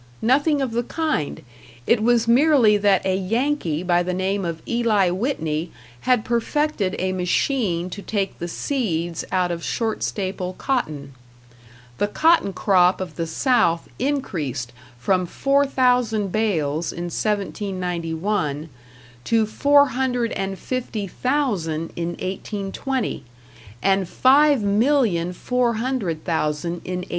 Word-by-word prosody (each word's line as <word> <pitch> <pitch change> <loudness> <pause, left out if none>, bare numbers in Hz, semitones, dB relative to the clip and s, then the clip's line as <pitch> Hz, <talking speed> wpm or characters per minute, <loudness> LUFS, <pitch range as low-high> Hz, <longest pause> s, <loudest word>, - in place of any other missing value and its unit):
Nothing 285 +4 +3
of 255 - -2
the 235 +1 0
kind; 305 - -2 0.4
it 235 -2 +3
was 230 0 +3
merely 250 -3 +5
that 200 -2 +2
a 190 -1 +2
Yankee 195 - -1
by 175 -1 +2
the 180 +1 -2
name 190 +2 -1
of 165 -1 -4
Eli 220 -6 +2
Whitney 170 - -2 0.4
had 245 -4 +3
perfected 235 -3 0
a 185 +1 -1
machine 185 0 0
to 200 - -6
take 200 -2 -3
the 170 - -3
seeds 175 - -2
out 180 -1 +1
of 170 -1 -4
short 225 -2 -2
staple 185 -2 -3
cotton. 150 - -2 0.9
The 205 - +2
cotton 320 -1 +3
crop 185 -1 +3
of 185 -1 -6
the 165 -1 -3
South 170 - +1
increased 165 - -2 0.2
from 180 +9 +1
four 275 +8 +2
thousand 245 -6 +1
bales 165 -8 0
in 175 - -6
1791 180 -5 -2 0.6
to 225 -1 +3
four 285 +6 +4
hundred 245 -2 -1
and 195 0 -3
fifty 235 -4 -3
thousand 190 - -1
in 170 0 -3
1820 200 - -3 0.6
and 195 -2 +2
five 280 +1 +4
million, 205 -5 +2
four 240 +5 0
hundred 220 -10 -2
thousand 160 -1 -1
in 180 0 -3
1860. - - -21
200 Hz, 130 wpm, -22 LUFS, 175-250 Hz, 0.9 s, merely